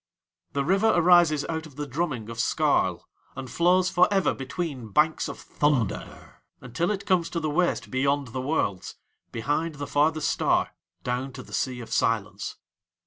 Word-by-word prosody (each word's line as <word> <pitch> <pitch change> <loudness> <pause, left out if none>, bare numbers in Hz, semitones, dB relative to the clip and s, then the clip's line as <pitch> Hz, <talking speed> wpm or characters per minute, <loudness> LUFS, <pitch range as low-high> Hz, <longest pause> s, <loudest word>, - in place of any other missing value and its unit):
The 140 -1 0
River 195 +6 +3
arises 175 -4 +5
out 160 -1 -3
of 145 - -17
the 150 +1 -4
drumming 140 -6 -3
of 115 0 -7
Skarl, - - +1 0.3
and 130 -2 -7
flows 180 +3 +3
for 180 +3 +4
ever 195 -2 +2
between 135 -2 -5
banks 155 +10 +2
of - - -6
thunder, 135 -9 -2 0.2
until 125 - -2
it 200 -1 -2
comes 185 -4 +2
to 170 - -2
the 155 -2 -2
waste 175 +3 0
beyond 140 +1 0
the 130 +2 -4
Worlds, 130 - -2 0.4
behind 150 +7 -1
the 145 0 -5
farthest 150 +2 +1
star, - - +1 0.3
down 125 +2 -2
to 130 0 -8
the - - -14
Sea 125 -2 -2
of 115 - -7
Silence. - - -1
145 Hz, 165 wpm, -26 LUFS, 130-170 Hz, 0.4 s, arises